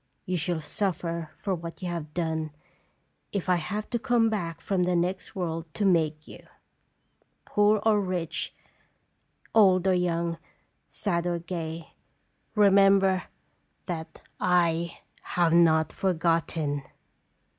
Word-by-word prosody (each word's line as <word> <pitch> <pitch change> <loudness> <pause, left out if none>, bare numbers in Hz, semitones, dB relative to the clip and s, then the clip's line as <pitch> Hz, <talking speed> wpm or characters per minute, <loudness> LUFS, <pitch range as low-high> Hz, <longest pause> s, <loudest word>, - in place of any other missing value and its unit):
You 185 - -1
shall 170 0 0
suffer 170 -2 -2
for 195 - -2
what 170 +1 -6
you - - -2
have 165 -3 -4
done, 160 -2 -1 0.8
if 200 -3 -3
I 180 -1 +4
have 210 +6 -4
to 240 - 0
come 235 -2 +2
back 170 -6 -3
from 190 +2 -1
the 180 0 +2
next 180 +4 -1
world 165 -3 -3
to 205 - 0
make 160 -4 +2
you. - - -11 1.1
Poor 210 +1 +3
or 215 -2 +4
rich, 180 -4 -3 1.0
old 190 -4 +5
or 190 - +4
young, 170 -2 0 0.5
sad 175 -4 -1
or 175 -1 0
gay, 165 -2 -6 0.6
remember 195 -2 +5 0.6
that 165 -3 -6 0.2
I 170 -2 +1 0.2
have 170 -2 +1
not 160 -2 +4
forgot 165 -3 +1
ten.'" 145 -3 -2
175 Hz, 125 wpm, -27 LUFS, 165-195 Hz, 1.1 s, old